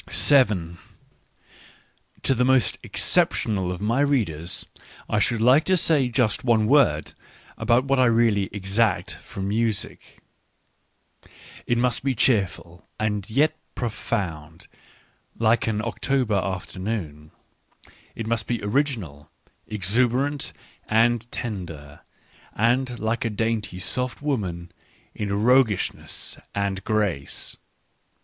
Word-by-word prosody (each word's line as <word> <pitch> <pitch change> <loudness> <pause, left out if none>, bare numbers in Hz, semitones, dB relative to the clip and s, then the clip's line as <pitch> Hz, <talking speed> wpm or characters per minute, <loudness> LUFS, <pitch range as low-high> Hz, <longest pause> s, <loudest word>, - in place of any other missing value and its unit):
To - - +3
the 125 0 +1
most 130 -1 +3
exceptional 95 -5 0
of 90 +1 -5
my 115 +5 +1
readers 95 - 0 0.4
I - - +1
should 115 -2 +1
like 130 +6 +5
to 190 -1 +3
say 150 -6 +2
just 120 -4 +1
one 115 -3 +3
word 120 - +3 0.4
about 120 +2 +2
what 135 -1 +2
I 130 - +5
really 115 -4 +2
exact 100 0 0
from 95 0 -6
music. 110 0 -2 1.5
£lt 120 - +2
must 125 +1 +1
be 135 -2 0
cheerful 90 - 0
and 105 -2 -1
yet 145 +7 +2 0.2
profound, 90 -9 -4 0.7
like 115 +1 +2
an 110 -1 -1
October 125 0 0
afternoon. 95 -4 -3 0.4
) - - -27
It 115 - -5
must 115 -1 -1
be 120 - -1
original, 105 - -2 0.4
exuberant, 125 - 0 0.4
and 115 +1 +2
tender, 80 -10 -6 0.6
and 120 +3 +1
like 110 +1 -1
a 115 - 0
dainty, 110 -3 -2
soft 125 +6 -3
woman 95 - -3 0.4
in 100 0 -2
roguishness 125 -5 +1 0.2
and 100 -1 -1
grace. 100 -11 -1
110 Hz, 110 wpm, -24 LUFS, 95-125 Hz, 1.5 s, like